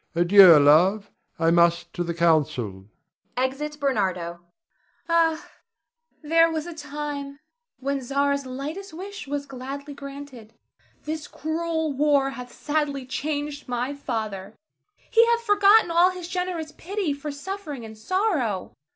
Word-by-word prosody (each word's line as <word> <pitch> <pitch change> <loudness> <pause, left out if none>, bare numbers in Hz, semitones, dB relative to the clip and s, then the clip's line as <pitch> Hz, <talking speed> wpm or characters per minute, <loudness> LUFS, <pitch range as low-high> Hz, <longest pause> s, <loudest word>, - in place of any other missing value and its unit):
Adieu, 175 0 +8
love; 180 +9 +4 0.3
I 165 0 +2
must 170 0 +3
to 175 - -2
the 170 -1 -4
council. 135 - +1 0.5
[Exit 280 +4 -2
Bernardo. 185 - -1 0.7
Zara. 330 -1 +3
Ah, - - -16 0.7
there 330 +2 +4
was 315 -1 -3
a 345 - -7
time 290 -2 -6 0.4
when 275 +1 -2
Zara's 280 +1 0
lightest 305 +9 -6
wish 395 -1 -8
was 285 0 -3
gladly 275 +2 -7
granted. 275 -5 -10 0.5
This 310 0 -5
cruel 320 0 -2
war 280 -1 +2
hath 250 -2 -9
sadly 290 -3 -2
changed 290 +2 -4
my 250 +2 -2
father; 215 -7 -5 0.6
he 460 - +6
hath 470 0 +2
forgotten 415 -2 +5
all 345 +2 +5
his 365 -2 -7
generous 360 -3 -3
pity 370 -1 -3
for 285 +1 -6
suffering 295 - -6
and 220 0 -10
sorrow. 250 - -1
280 Hz, 130 wpm, -24 LUFS, 225-320 Hz, 0.7 s, Adieu